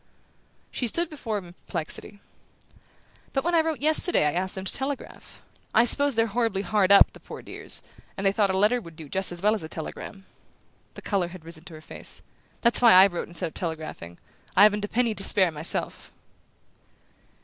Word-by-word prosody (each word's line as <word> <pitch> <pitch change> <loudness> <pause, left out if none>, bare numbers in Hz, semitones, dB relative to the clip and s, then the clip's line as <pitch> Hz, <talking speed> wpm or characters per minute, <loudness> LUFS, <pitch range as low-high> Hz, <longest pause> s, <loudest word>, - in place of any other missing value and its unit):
She 245 - -2
stood 340 +8 -1
before 230 -8 -4
him 195 - -7
in - - -15
perplexity. 180 +4 -6 1.1
"But 270 - 0
when 345 +2 -1
I 330 - +5
wrote 320 -3 -3
yesterday 315 - +4
I 150 - +2
asked 185 +2 -3
them 190 0 -6
to - - -3
telegraph. 270 0 -5 0.3
I 225 - +6
suppose 280 +2 +5
they're 225 0 +3
horribly 225 -3 -1
hard 200 0 +1
up, 200 - +7
the - - -14
poor - - -11
dears, - - -6 0.3
and 195 - -4
they 195 - +4
thought 200 0 +1
a 190 - 0
letter 215 +5 +2
would 165 -5 -13
do 160 -2 -10
as 180 -2 -1
well 210 +1 +4
as 220 - -3
a 160 - -8
telegram." 195 +4 -8 0.7
The - - -11
colour 195 -4 -1
had 175 -2 -12
risen 165 0 -9
to 170 -4 -11
her 155 - -12
face. - - -7 0.4
"That's 235 +1 +4
why 235 -4 +7
I 185 +1 +9
wrote 175 -3 -3
instead 170 -1 -5
of - - -23
telegraphing; 155 - -6 0.4
I 200 - +8
haven't 210 0 +4
a - - -7
penny 235 +1 0
to 200 - +1
spare 190 -3 +3
myself!" 155 +2 -1
200 Hz, 200 wpm, -25 LUFS, 175-235 Hz, 1.1 s, I